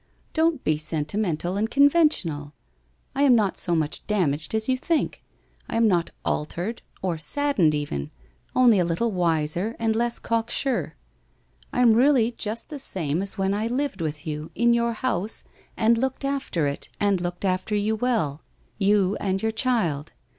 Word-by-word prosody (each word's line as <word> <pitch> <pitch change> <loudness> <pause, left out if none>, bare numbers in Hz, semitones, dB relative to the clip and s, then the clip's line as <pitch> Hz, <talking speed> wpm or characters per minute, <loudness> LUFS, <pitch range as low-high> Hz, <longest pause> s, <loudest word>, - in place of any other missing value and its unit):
' - - -38
Don't 325 0 +1
be 155 -1 +1
sentimental 160 +3 -2
and 220 +2 0
conventional. 275 - +3 0.6
I 275 - -1
am 270 -4 +6
not 200 -5 +1
so 175 - +1
much 155 -2 -2
damaged 165 -4 0
as 220 0 0
you 260 - +3
think. 315 +5 -1 0.5
I - - -1
am 230 -1 +4
not 175 -4 +2 0.2
altered, 175 +9 -2 0.2
or 175 -4 -1
saddened 195 - +2
even, 75 - -3 0.5
only 240 -5 +5
a - - +3
little 175 +7 0
wiser 175 +3 0
and 225 -1 0
less 235 +1 0
cocksure. 235 +3 -1 0.8
I 250 - 0
am 235 -2 +6
really 245 -1 +4
just 230 +1 -3
the 295 -3 -6
same 170 - -1
as 200 +2 -4
when 195 0 +1
I 215 +2 -1
lived 265 -2 -2
with 150 -2 -4
you, 150 -1 -4
in 235 +2 +4
your 235 0 +1
house, 220 -3 -1 0.3
and 230 +1 +3
looked 265 +2 -2
after 275 - -1
it, 140 0 -3
and 200 -3 +2
looked 175 +2 -4
after 185 +3 0
you 210 +2 +1
well. 215 - 0 0.4
You 200 -1 +3
and 190 -1 -1
your 220 - +1
child. 185 - 0
210 Hz, 170 wpm, -25 LUFS, 165-235 Hz, 0.8 s, am